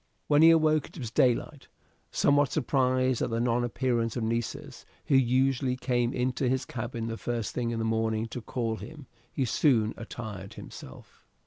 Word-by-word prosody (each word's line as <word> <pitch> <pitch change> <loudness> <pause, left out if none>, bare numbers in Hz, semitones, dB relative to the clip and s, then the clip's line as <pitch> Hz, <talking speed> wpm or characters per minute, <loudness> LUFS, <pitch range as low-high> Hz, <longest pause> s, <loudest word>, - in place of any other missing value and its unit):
When 145 0 +4
he 165 - +9
awoke 155 -2 +3
it - - -15
was 120 -6 -5
daylight. 130 +4 +1 0.4
Somewhat 145 0 +3
surprised 130 -3 +1
at - - 0
the 115 0 -1
non 120 0 +1
appearance 120 -2 -1
of 120 - -2
Nessus, 120 +4 -3 0.2
who 145 - +2
usually 130 0 +2
came 125 -1 0
into 125 +1 0
his 130 0 0
cabin 115 -1 -5
the 115 0 -4
first 115 -3 -3
thing 120 -2 -1
in 115 - -2
the 110 - -1
morning 110 0 0
to 125 - -6
call 115 -1 -3
him, 150 +2 -10 0.3
he 135 - -1
soon 115 -4 +2
attired 110 -4 -7
himself. 65 - -12
125 Hz, 175 wpm, -28 LUFS, 115-135 Hz, 0.4 s, he